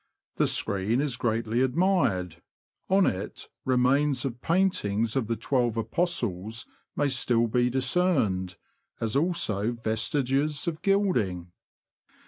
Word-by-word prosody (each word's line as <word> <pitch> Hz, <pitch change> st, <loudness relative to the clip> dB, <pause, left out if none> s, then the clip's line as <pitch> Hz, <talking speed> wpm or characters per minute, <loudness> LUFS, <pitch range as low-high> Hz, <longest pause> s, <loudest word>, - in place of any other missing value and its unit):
The -, -, +3 dB
screen 100 Hz, +5 st, 0 dB
is 140 Hz, -3 st, -1 dB
greatly 115 Hz, -1 st, 0 dB
admired: 130 Hz, -, +1 dB, 0.5 s
on 190 Hz, 0 st, +4 dB
it 95 Hz, +3 st, -3 dB, 0.2 s
remains 130 Hz, +2 st, +2 dB
of 125 Hz, -2 st, -4 dB
paintings 115 Hz, -, +1 dB
of 130 Hz, -5 st, 0 dB
the 115 Hz, -, 0 dB
Twelve 120 Hz, 0 st, 0 dB
Apostles 115 Hz, -, -2 dB, 0.3 s
may 145 Hz, -, +1 dB
still 120 Hz, -3 st, +1 dB
be 120 Hz, +2 st, +1 dB
dis 130 Hz, +1 st, -1 dB
cerned, 110 Hz, -, +1 dB, 0.4 s
as 115 Hz, +1 st, -2 dB
also 130 Hz, -, +1 dB
vestiges 135 Hz, +7 st, -1 dB
of 160 Hz, -2 st, -3 dB
gilding. 120 Hz, -, +1 dB
125 Hz, 115 wpm, -27 LUFS, 110-145 Hz, 0.5 s, on